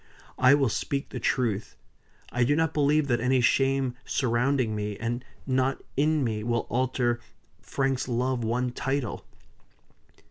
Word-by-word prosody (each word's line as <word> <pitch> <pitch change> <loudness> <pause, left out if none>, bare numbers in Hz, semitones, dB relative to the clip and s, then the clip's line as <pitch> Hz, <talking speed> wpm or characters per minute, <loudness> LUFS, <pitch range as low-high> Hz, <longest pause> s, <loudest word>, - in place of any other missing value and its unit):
I 130 +2 +7
will 140 -2 +2
speak 140 +5 -2
the 125 - -5
truth. 115 -4 -1 0.6
I 125 - +1
do 145 +4 +3
not 160 0 +1
believe 150 0 +3
that 120 -3 +1
any 130 +1 +3
shame 135 +1 +2
surrounding 125 -1 +1
me, 105 -1 -3
and 120 +2 -3 0.2
not 130 0 0
in 150 +1 +2
me, 110 -3 -2
will 120 0 0
alter 125 -1 0 0.4
Frank's 135 -1 -1
love 125 0 0
one 120 +2 0
title." 135 -2 -2
130 Hz, 140 wpm, -27 LUFS, 120-135 Hz, 0.6 s, I